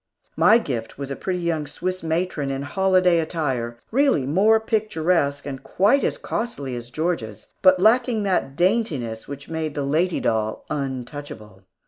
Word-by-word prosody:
My 220 - +6
gift 125 - -4
was 140 0 -5
a - - -2
pretty 185 +4 -3
young 160 -3 -1
Swiss 185 +4 -4
matron 160 -3 -1
in 135 0 -3
holiday 185 +1 +3
attire, 135 -8 -2
really 265 - +3
more 200 +10 +4
picturesque, 175 -10 0
and 135 -2 -6
quite 215 +9 +2
as - - 0
costly 140 - -4
as 120 0 -7
Georgia's, 140 - -3 0.2
but 185 -1 +6
lacking 225 +2 +3
that 180 -8 0
daintiness 160 - 0
which 140 0 -8
made 160 -2 -3
the 145 - -1
lady 165 +5 +1
doll 110 -1 -1
untouchable. 130 -7 -6
160 Hz, 150 wpm, -23 LUFS, 135-185 Hz, 0.2 s, My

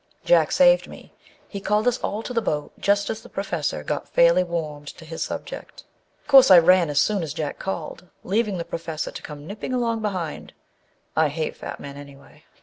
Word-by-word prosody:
Jack - - +4
saved - - +5
me: - - -13 0.3
he 200 - -7
called 210 +4 +1
us 245 0 +2
all 215 +2 -3
to 250 - -6
the 230 - +1
boat 150 -8 -2
just 200 +2 +1
as 220 0 -6
the - - -14
Professor 175 -7 -3
got 150 -1 -4
fairly 170 +2 +4
warmed 155 -4 -5
to 165 +2 -10
his 160 0 -7
sub - - -5
ject. - - -10 0.4
Of - - -31
course, 270 -5 +8
I 185 - +10
ran 175 0 +5
as 145 -1 +1
soon 210 -3 +2
as 155 -3 -5
Jack 155 -3 -4
called, 180 -1 -5 0.2
leaving 205 0 0
the 170 - -4
Professor 165 -2 -5
to - - -8
come 150 -1 -9
nipping 210 +8 -5
along 230 -2 0
behind 185 -7 -4 0.6
â 160 - +4
I - - +1
hate 155 +2 -3
fat - - -8
men, 140 0 -9
anyway. 140 -1 -14
180 Hz, 210 wpm, -23 LUFS, 155-215 Hz, 0.6 s, I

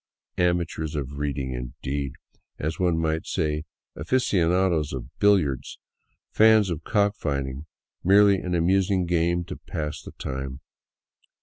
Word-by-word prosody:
" - - -54
Amateurs 80 -3 -2
of 70 -1 -4
reading," 70 -3 -2
indeed! 65 +3 -4 0.4
As 80 +2 -3
one 90 -3 +2
might 80 0 -1
say, 75 0 -1 0.3
aficionados 85 - +1
of 65 0 -7
billiards, 90 -11 +2 0.5
"fans" 110 -3 +5
of 80 -1 -4
cock 105 0 +2
fighting; 70 -2 -3 0.4
merely 100 +1 +6
an 90 -1 -2
amusing 95 +2 +2
game 85 0 +1
to - - -7
pass 75 -1 -5
the - - -11
time. 65 0 -5
80 Hz, 125 wpm, -25 LUFS, 70-90 Hz, 0.5 s, merely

